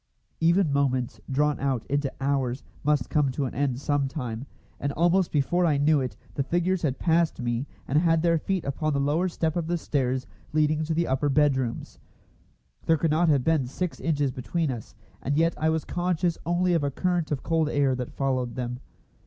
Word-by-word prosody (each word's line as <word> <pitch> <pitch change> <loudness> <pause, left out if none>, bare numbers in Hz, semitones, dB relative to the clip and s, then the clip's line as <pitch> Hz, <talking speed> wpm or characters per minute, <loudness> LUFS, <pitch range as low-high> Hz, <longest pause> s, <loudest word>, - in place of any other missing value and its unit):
Even 170 -1 +3
moments 130 -3 0
drawn 145 +2 +1
out 135 -4 -1
into 140 -1 -1
hours 135 -2 -1 0.2
must 145 -4 +2
come 150 -3 +3
to 135 +2 -2
an 130 - -4
end 130 -2 -1
some 145 -1 0
time, 125 -2 -5 0.3
and 140 - -1
almost 175 +3 +2
before 155 +5 +1
I 155 -4 +3
knew 145 0 +3
it 130 - -4 0.2
the - - -1
figures 175 +6 0
had 140 -4 0
passed 165 -1 +2
me 120 +2 -2 0.2
and 145 - +3
had 165 -1 +2
their 165 -1 +3
feet 190 +2 -2
upon 150 +2 -1
the 140 - +1
lower 150 +6 +1
step 160 -2 -1
of 170 -2 -1
the 175 +1 0
stairs 130 -5 -1 0.3
leading 155 0 +2
to 160 0 -1
the 170 +1 +2
upper 135 +1 0
bedrooms. 135 -4 0 0.9
There 160 - +5
could 160 0 +1
not 165 +2 +3
have 140 -4 +3
been 155 -5 +2
six 175 +7 -4
inches 145 -4 0
between 145 +5 -2
us, 115 -4 -8 0.3
and 145 +2 -1
yet 165 +1 +3
I 160 - +1
was 160 -1 0
conscious 175 -1 0
only 175 +1 +2
of 165 -3 +2
a 140 - +1
current 175 +3 -1
of 140 - -2
cold 160 -2 +1
air 140 -3 +2
that 125 -1 -4
followed 130 -3 -1
them. 125 -1 -4
145 Hz, 200 wpm, -26 LUFS, 135-165 Hz, 0.9 s, There